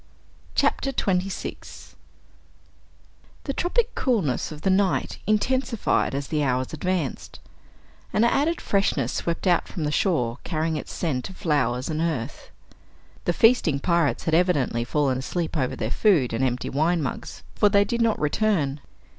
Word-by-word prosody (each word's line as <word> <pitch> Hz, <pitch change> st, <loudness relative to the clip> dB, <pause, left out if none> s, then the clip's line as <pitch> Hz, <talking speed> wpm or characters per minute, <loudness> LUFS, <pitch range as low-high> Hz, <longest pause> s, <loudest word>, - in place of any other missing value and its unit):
CHAPTER 275 Hz, -, +1 dB
26 190 Hz, -5 st, -3 dB, 1.5 s
The 275 Hz, -, -3 dB
tropic 470 Hz, -, 0 dB
coolness 200 Hz, -, 0 dB
of 150 Hz, -1 st, -9 dB
the 195 Hz, -, +3 dB
night 190 Hz, -1 st, +1 dB
intensified 230 Hz, -, +1 dB
as 140 Hz, 0 st, -4 dB
the 150 Hz, -2 st, 0 dB
hours 130 Hz, 0 st, -1 dB
advanced. 170 Hz, -3 st, -3 dB, 0.7 s
An 215 Hz, -, +2 dB
added 290 Hz, +8 st, +2 dB
freshness 155 Hz, -, 0 dB
swept 170 Hz, +2 st, -2 dB
out 175 Hz, -3 st, +3 dB
from 170 Hz, -, -5 dB
the 150 Hz, -, 0 dB
shore 135 Hz, -, 0 dB
carrying 160 Hz, -1 st, -1 dB
its 150 Hz, -, -5 dB
scent 140 Hz, -5 st, -2 dB
of 190 Hz, -, -12 dB
flowers 130 Hz, -6 st, 0 dB
and 155 Hz, -1 st, -2 dB
earth. 150 Hz, -6 st, -3 dB, 0.8 s
The -, -, +2 dB
feasting 225 Hz, -, +4 dB
pirates 170 Hz, -1 st, +1 dB
had 160 Hz, -, -1 dB
evidently 160 Hz, -9 st, +2 dB
fallen 135 Hz, 0 st, 0 dB
asleep 165 Hz, +5 st, -3 dB
over 130 Hz, -5 st, 0 dB
their 110 Hz, -, -3 dB
food 160 Hz, -, +3 dB
and 115 Hz, +3 st, 0 dB
empty 125 Hz, -1 st, -1 dB
wine 160 Hz, +4 st, +1 dB
mugs, 130 Hz, -, -6 dB
for 205 Hz, -, +3 dB
they 200 Hz, 0 st, +4 dB
did 235 Hz, +1 st, -1 dB
not 230 Hz, -2 st, +2 dB
return. 150 Hz, -4 st, 0 dB
165 Hz, 145 wpm, -24 LUFS, 140-200 Hz, 1.5 s, feasting